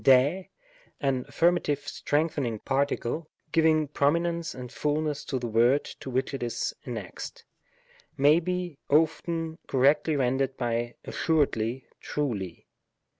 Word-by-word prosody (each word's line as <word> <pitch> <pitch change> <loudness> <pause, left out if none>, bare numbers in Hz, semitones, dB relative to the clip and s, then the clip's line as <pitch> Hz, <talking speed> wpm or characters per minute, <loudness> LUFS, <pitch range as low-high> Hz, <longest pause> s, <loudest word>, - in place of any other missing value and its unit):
Srjy 140 +8 +5 0.5
an 130 -3 0
affirmative 150 -1 +1
strengthening 145 -6 0
participle, 140 +4 -1 0.2
giving 160 -2 +4
prominence 170 +4 0
and 125 -1 -7
fulness 150 0 -1
to 135 - -2
the 125 - -4
word 120 +5 +3 0.2
to - - -7
which 130 +2 -1
it 135 - -4
is 120 -1 -2
an 125 - -4
nexed, 105 -5 -7 0.7
may 145 +4 +6
be 180 -3 -3
often 160 +2 +1
correctly 145 +4 +3
rendered 135 0 +1
by 120 -1 -1
dssuredly^ 130 -6 0 0.2
trvkj. 105 - -3
140 Hz, 120 wpm, -28 LUFS, 125-160 Hz, 0.7 s, may